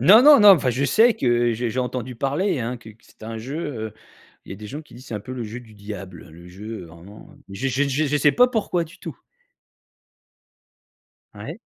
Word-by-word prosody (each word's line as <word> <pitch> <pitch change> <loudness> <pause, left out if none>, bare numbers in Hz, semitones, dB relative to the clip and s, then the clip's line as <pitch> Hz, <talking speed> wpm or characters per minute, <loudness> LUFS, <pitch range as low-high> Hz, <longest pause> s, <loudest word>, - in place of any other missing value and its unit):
Non, 215 +6 +8
non, 290 -2 +8
non, 205 -1 +9
enfin 145 -9 +5
je 130 +4 -1
sais 225 - +4
que 120 -1 +1
je 120 +2 -2
j'ai 115 - -4
entendu 125 0 -4
parler, 145 - 0
hein, 120 +2 -3
que 115 -2 -13
que 110 +2 -22
c'était - - -16
un 115 0 -6
jeu, 130 +7 -6 0.3
heu, - - -16 0.5
il - - -15
y - - -6
a - - -12
des 105 +1 -9
gens 145 +9 -7
qui 150 - -18
disent: 125 +2 -13
«C'est 115 - -5
un 105 - -4
peu 125 +6 -9
le 125 -2 -5
jeu 110 +3 -7
du 115 -3 -17
diable», 100 -4 -9
le 85 +2 -14
jeu 105 +2 -8
vraiment. 85 +6 -14 0.2
Je 115 +8 -3
je 135 +3 +1
je 140 +3 0
je 150 +1 +1
sais 145 0 +3
pas 250 - +5
pourquoi 200 -7 -1
du 165 - -16
tout. - - -9 2.1
Ouais. - - -8
125 Hz, 230 wpm, -22 LUFS, 110-145 Hz, 2.1 s, non